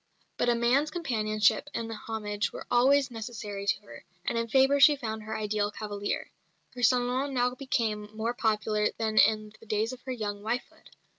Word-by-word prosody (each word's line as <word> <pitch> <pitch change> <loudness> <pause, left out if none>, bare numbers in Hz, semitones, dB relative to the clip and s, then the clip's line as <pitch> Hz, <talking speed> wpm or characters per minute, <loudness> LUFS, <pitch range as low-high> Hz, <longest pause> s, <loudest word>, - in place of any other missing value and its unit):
But 240 - +1
a 240 - +4
man's 250 +6 +2
companionship 220 -6 +1
and 225 -1 -3
homage 210 -1 -3
were - - -8
always 270 +2 +4
necessary 215 -3 -6
to - - +1
her, 205 - -13 0.2
and - - -1
in 230 0 0
Fabre 270 +4 +4
she 295 +1 +8
found 220 -5 -4
her 220 +1 -5
ideal 210 -1 0
cavalier. 205 -1 -4 0.4
Her 250 - -7
salon 250 +3 +2
now 250 0 +2
became 225 -6 -2
more 230 +2 -1
popular 215 -2 0
even - - 0
than 220 -1 -1
in 215 -1 +3
the 225 - -17
days 215 +3 0
of 255 - -10
her 260 - -6
young 205 -4 -4
wifehood. 230 +4 -4
225 Hz, 180 wpm, -29 LUFS, 215-250 Hz, 0.4 s, she